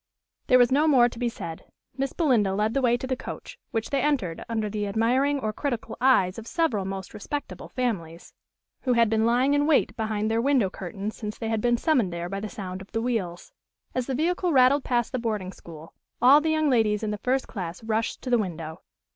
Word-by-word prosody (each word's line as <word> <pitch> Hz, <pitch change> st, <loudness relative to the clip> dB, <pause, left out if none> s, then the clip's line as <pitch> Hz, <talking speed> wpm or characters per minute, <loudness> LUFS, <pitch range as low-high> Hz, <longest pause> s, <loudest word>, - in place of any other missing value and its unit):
There 255 Hz, -, +6 dB
was 245 Hz, 0 st, +4 dB
no 295 Hz, +4 st, +3 dB
more 255 Hz, -5 st, +6 dB
to 235 Hz, -1 st, -9 dB
be 245 Hz, -1 st, 0 dB
said. 165 Hz, -7 st, -7 dB, 0.3 s
Miss 270 Hz, 0 st, -2 dB
Belinda 230 Hz, -, +2 dB
led 215 Hz, +2 st, 0 dB
the 275 Hz, -, +1 dB
way 240 Hz, -1 st, +3 dB
to 255 Hz, -, -5 dB
the 260 Hz, 0 st, -1 dB
coach, -, -, -8 dB
which 225 Hz, -1 st, -3 dB
they 275 Hz, -2 st, +1 dB
entered 245 Hz, -, -1 dB
under 220 Hz, -2 st, -1 dB
the 210 Hz, 0 st, -3 dB
admiring 255 Hz, +7 st, +1 dB
or 215 Hz, -4 st, -2 dB
critical 240 Hz, -1 st, -3 dB
eyes 210 Hz, -7 st, +3 dB
of 225 Hz, -, -10 dB
several 240 Hz, -, 0 dB
most 190 Hz, -1 st, -6 dB
respectable 290 Hz, +8 st, -6 dB
families, 175 Hz, -10 st, -3 dB, 0.5 s
who 255 Hz, -, +1 dB
had 230 Hz, -2 st, +3 dB
been 220 Hz, 0 st, +2 dB
lying 250 Hz, +4 st, +3 dB
in 290 Hz, +1 st, +2 dB
wait 315 Hz, -, +3 dB
behind 215 Hz, -1 st, -1 dB
their 225 Hz, +1 st, +2 dB
window 255 Hz, -7 st, +2 dB
curtains 195 Hz, +3 st, -6 dB
since 210 Hz, -1 st, -6 dB
they 225 Hz, -, -4 dB
had 220 Hz, -1 st, 0 dB
been 240 Hz, +1 st, +2 dB
summoned 240 Hz, -, +2 dB
there 170 Hz, +1 st, -4 dB
by 195 Hz, +1 st, -3 dB
the 215 Hz, +1 st, -5 dB
sound 185 Hz, -2 st, -6 dB
of 195 Hz, -, -13 dB
the 225 Hz, -, 0 dB
wheels. 195 Hz, -8 st, -3 dB, 0.4 s
As 255 Hz, -1 st, -2 dB
the 265 Hz, -, -1 dB
vehicle 350 Hz, +4 st, 0 dB
rattled 265 Hz, 0 st, +5 dB
past 240 Hz, -2 st, 0 dB
the 255 Hz, -, -2 dB
boarding 210 Hz, -5 st, -2 dB
school, 165 Hz, -2 st, -12 dB, 0.3 s
all 270 Hz, +5 st, +7 dB
the 320 Hz, -, 0 dB
young 310 Hz, -1 st, +2 dB
ladies 220 Hz, -5 st, +2 dB
in 215 Hz, -, -1 dB
the 210 Hz, -, -4 dB
first 260 Hz, +3 st, 0 dB
class 180 Hz, -2 st, -6 dB
rushed 220 Hz, 0 st, -2 dB
to 255 Hz, -, -4 dB
the 240 Hz, -, +4 dB
window. 165 Hz, -4 st, -5 dB
230 Hz, 220 wpm, -26 LUFS, 200-260 Hz, 0.5 s, all